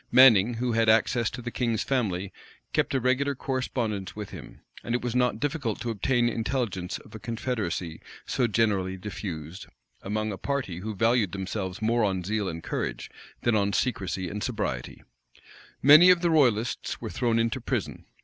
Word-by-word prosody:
Manning, 120 -3 +7
who 120 +1 -1
had 115 -1 +2
access 115 +1 +3
to 125 0 -8
the 120 - -4
king's 115 -4 0
family, 100 -8 -1 0.4
kept - - +1
a - - +3
regular 130 +3 +1
correspondence 120 -7 -3
with 105 -2 -6
him; - - -11 0.2
and 120 - -1
it 120 - -2
was 120 -2 -2
not 125 -3 +1
difficult 140 -7 -2
to 120 +1 -2
obtain 120 +3 +1
intelligence 115 -6 -2
of - - -16
a - - -7
confederacy 110 -8 -3 0.2
so 125 - +1
generally 100 -4 +1
diffused, 90 -3 -6 0.3
among 110 +2 -2
a 95 - -6
party 135 -12 -2
who 110 +2 -5
valued 115 -2 +2
themselves 95 0 -4
more 115 +1 +2
on 95 -3 0
zeal 105 +1 -1
and 85 0 -6
courage, - - -4 0.3
than 120 -2 +3
on 100 -1 +1
secrecy 95 -7 -1
and 105 +4 -4
sobriety 105 - -3 0.8
Many 155 +6 +9
of 180 -2 +6
the 170 -2 +2
royalists 120 -7 +1
were - - -6
thrown 115 +4 +1
into 115 -1 0
prison. - - -3
115 Hz, 170 wpm, -27 LUFS, 100-125 Hz, 0.8 s, Many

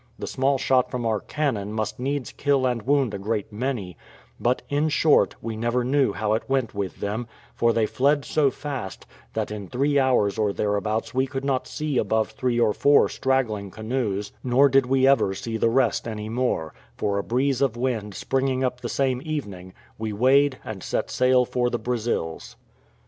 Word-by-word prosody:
The - - -5
small 135 +1 +1
shot 130 -1 +2
from 125 -2 -3
our 110 -2 +1
cannon 115 -10 -2
must 110 +1 -3
needs 135 0 -2
kill 140 -2 +1
and 125 -2 0
wound 135 -1 +1
a 100 - -4
great 105 0 -3
many; 110 -6 -3 0.4
but, 125 +2 0
in 145 +2 +1
short, 155 0 +3
we 115 -1 -3
never 120 +3 0
knew 135 -2 +2
how 105 +1 -1
it 110 - +1
went 135 -4 0
with 100 -3 -4
them, 110 +4 -3 0.3
for 115 - +2
they 115 -1 +2
fled 140 +5 +1
so 150 -3 +2
fast, 130 -7 -6 0.3
that - - -2
in 105 -2 -6
three 140 +6 +1
hours 120 -6 +2
or 105 -2 +1
thereabouts 105 +2 -1
we 130 +1 +1
could 135 0 -5
not 135 -2 0
see 150 -4 -1
above 110 0 0
three 120 +1 -1
or 110 -3 +3
four 145 +5 +4
straggling 115 -7 -1
canoes, 110 -2 -3
nor 130 +3 +4
did 135 -1 +3
we 130 0 +3
ever 135 -8 +3
see 115 +3 -5
the 115 +1 +2
rest 120 -1 +1
any 110 -1 -5
more; 115 -10 -1 0.2
for 100 -1 0
a - - -2
breeze 130 +3 0
of 130 -4 +1
wind 115 -5 -2
springing 130 -1 0
up 125 -1 -2
the 120 - -4
same 130 -2 0
evening, 100 - -5 0.3
we 110 -1 -3
weighed 130 +5 +3
and 105 -4 -6
set - - -2
sail 125 0 +3
for 120 0 0
the 120 - -1
Brazils. 115 -8 -3
125 Hz, 190 wpm, -24 LUFS, 110-135 Hz, 0.4 s, four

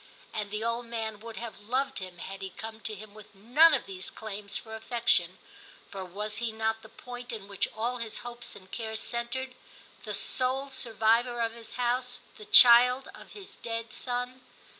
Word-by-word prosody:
And 210 -2 -2
the 210 +1 -3
old 230 +1 -1
man 220 -2 -3
would 225 0 -9
have 230 -2 -6
loved 255 +5 0
him 185 -2 -8
had 195 +3 -7
he 190 - -4
come 220 +3 -8
to 220 -1 -4
him 205 0 -11
with 215 -1 -14
none 280 +11 +7
of 265 - -2
these 190 -1 -5
claims 205 -2 -5
for 220 - -8
affection, 220 -6 +2 0.5
for 195 -1 -5
was 210 +4 -3
he 235 0 -1
not 220 0 -1
the 220 - -13
point 245 +2 -8
in 215 -4 -6
which 200 -1 0
all 240 +3 0
his 230 -2 -4
hopes 240 0 -7
and 185 -1 -14
cares 220 -1 -3
centred, 245 +2 -3 0.5
the - - -3
sole 265 +2 0
survivor 235 0 +2
of 230 -1 +1
his 230 0 -8
house, 250 0 0 0.2
the 425 - -10
child 250 - +8
of - - -12
his 400 -2 -10
dead 230 0 -4
son 250 +1 -2
230 Hz, 185 wpm, -30 LUFS, 215-245 Hz, 0.5 s, child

